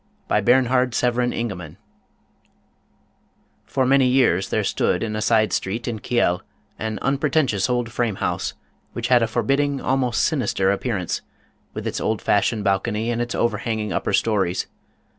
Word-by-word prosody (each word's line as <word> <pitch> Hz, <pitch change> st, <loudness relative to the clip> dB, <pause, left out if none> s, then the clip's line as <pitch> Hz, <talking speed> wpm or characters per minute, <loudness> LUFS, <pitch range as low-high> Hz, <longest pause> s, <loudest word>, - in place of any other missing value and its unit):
270 120 Hz, -, +3 dB, 0.2 s
Bernhard 125 Hz, -1 st, +1 dB
Severin 125 Hz, 0 st, +1 dB
Ingemann 95 Hz, -9 st, -5 dB
The -, -, -40 dB
Sealed -, -, -17 dB
Room 130 Hz, -, +4 dB
T7OR -, -, 0 dB
many 135 Hz, -1 st, +5 dB
years 120 Hz, -8 st, +2 dB
there -, -, 0 dB
stood -, -, 0 dB
in 110 Hz, -1 st, -3 dB
a 110 Hz, -, -2 dB
side 110 Hz, -1 st, +2 dB
street 110 Hz, +5 st, -2 dB
in 115 Hz, -3 st, -3 dB
Kiel 100 Hz, -7 st, +1 dB, 0.4 s
an 110 Hz, 0 st, -3 dB
unpretentious 135 Hz, -6 st, +1 dB
old 120 Hz, -2 st, -1 dB
frame 115 Hz, -4 st, -1 dB
house 90 Hz, -2 st, -2 dB, 0.4 s
which 120 Hz, +1 st, -3 dB
had 125 Hz, -1 st, +5 dB
a 115 Hz, -, +2 dB
forbid 120 Hz, +4 st, +1 dB
ding, 145 Hz, -1 st, 0 dB
almost 130 Hz, -3 st, 0 dB
sinister 120 Hz, -, +1 dB
appearance, 100 Hz, -3 st, -2 dB, 0.5 s
with -, -, -5 dB
its -, -, -3 dB
old 110 Hz, -1 st, 0 dB
fashioned 105 Hz, +1 st, +1 dB
bal 100 Hz, -1 st, +2 dB
cony 110 Hz, +2 st, -2 dB
and 120 Hz, 0 st, -1 dB
its 120 Hz, 0 st, -3 dB
overhanging 110 Hz, -2 st, -1 dB
upper -, -, -1 dB
stories. 95 Hz, -5 st, +1 dB
115 Hz, 165 wpm, -22 LUFS, 105-125 Hz, 0.5 s, many